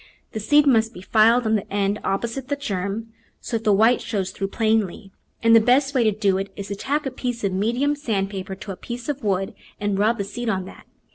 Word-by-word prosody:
The 220 - -4
seed 290 +8 +4
must 225 -4 +3
be 180 - -9
filed 225 +4 +4
on 220 - +2
the 210 -3 -1
end 200 +1 0
opposite 235 +6 -2
the 285 - 0
germ, 215 -2 -4 0.3
so 230 - -2
that 225 - -9
the 210 - +4
white 225 +5 +4
shows 200 -5 -2
through 195 +1 -3
plainly, 215 -2 0 0.3
and 230 0 +6
the - - +9
best 265 +5 +3
way 255 -4 +3
to 215 - +3
do 200 -2 +1
it 195 +1 -5
is 200 -1 -7
to 200 - -3
tack 285 +8 -2
a 270 - -2
piece 245 -2 -4
of 195 -2 0
medium 240 +9 +1
sand 210 -9 -2
paper 190 -1 -5
to 205 +1 -8
a - - -5
piece 240 +7 -7
of 285 -3 -3
wood 195 -2 0 0.3
and 205 -1 -1
rub 220 +3 +2
the 200 - -1
seed 230 +4 -4
on 190 -3 -1
that. - - -13
220 Hz, 240 wpm, -23 LUFS, 195-240 Hz, 0.3 s, the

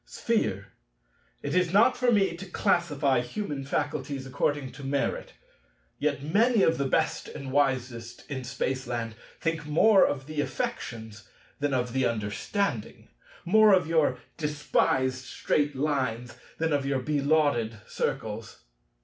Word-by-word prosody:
Sphere. - - -1 0.7
It - - -2
is 180 -1 +2
not 205 +4 +5
for 245 -1 +2
me 195 -6 +3
to 190 +3 -9
classify 145 -7 +1
human 140 +2 -4
faculties 140 -1 -2
according 140 0 -1
to 140 - -11
merit. 140 - -2 0.7
Yet 145 -1 0
many 215 +7 +3
of 160 - +3
the 140 - +1
best - - 0
and 135 -1 -7
wisest 125 -4 -1
in 135 -3 -4
Spaceland 120 -2 -3 0.3
think 165 -2 -2
more 195 +7 +5
of 135 -2 -3
the 155 0 -2
affections 110 -5 -5 0.3
than 145 -1 0
of 125 -2 -1
the 130 -1 +2
understanding, 115 - -3 0.4
more 215 +3 +6
of 180 -3 +1
your 160 -1 +2 0.2
despised 135 -4 0
Straight 145 +1 0
Lines 130 -5 -1 0.2
than 160 -1 0
of 140 -1 +1
your 135 0 0
belauded 145 -6 +1
Circles. 110 +1 -4
140 Hz, 130 wpm, -28 LUFS, 130-160 Hz, 0.7 s, more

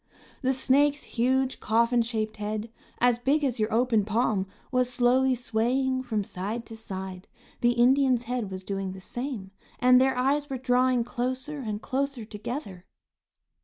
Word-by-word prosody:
The 260 -1 +2
snake's 285 +3 +2
huge, 260 +2 0
coffin 235 +2 +2
shaped 220 -2 -2
head, 215 +2 -4 0.3
as 245 -1 +3
big 285 +5 +1
as 255 -4 0
your 215 +1 0
open 230 -1 +3
palm, 215 -2 0 0.2
was 250 -1 +2
slowly 255 +1 +3
swaying 250 +3 0
from 220 -5 -2
side 205 +5 -5
to 225 - -9
side. 190 -4 -7 0.3
The 240 0 +3
Indian's 250 0 +4
head 240 -3 -3
was 190 0 -6
doing 195 -1 -3
the 190 - -9
same, 240 -1 -5 0.3
and 250 0 +6
their 265 -1 +2
eyes 285 +3 +1
were 265 - -2
drawing 250 -1 +2
closer 255 +5 -3
and 215 -5 -4
closer 270 -3 -2
together. 210 -3 -6
245 Hz, 155 wpm, -27 LUFS, 215-260 Hz, 0.3 s, and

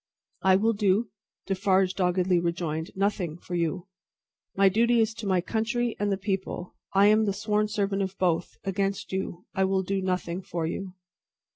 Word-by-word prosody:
"I 190 -1 +5
will 220 +4 +3
do," 205 +1 +1 0.3
Defarge 190 -1 +2
doggedly 180 -1 +2
rejoined, 170 -2 -2
"nothing 190 -5 -1
for 175 - -9
you. 170 +2 -1 0.7
My 195 0 +5
duty 235 +4 +3
is 220 -1 +2
to 220 -2 -6
my 185 -2 +2
country 235 +4 -1
and 205 0 0
the 195 - +1
People. 190 -2 -3 0.2
I 195 +1 +6
am 215 +1 +5
the 200 - 0
sworn 210 +1 0
servant 200 -2 -1
of 190 0 -3
both, 175 -2 0
against 195 0 -2
you. 185 -2 -4
I 190 - +1
will 190 0 +1
do 195 +1 -1
nothing 180 -1 -2
for 170 -3 -3
you." 185 +3 -4
195 Hz, 170 wpm, -27 LUFS, 180-205 Hz, 0.7 s, I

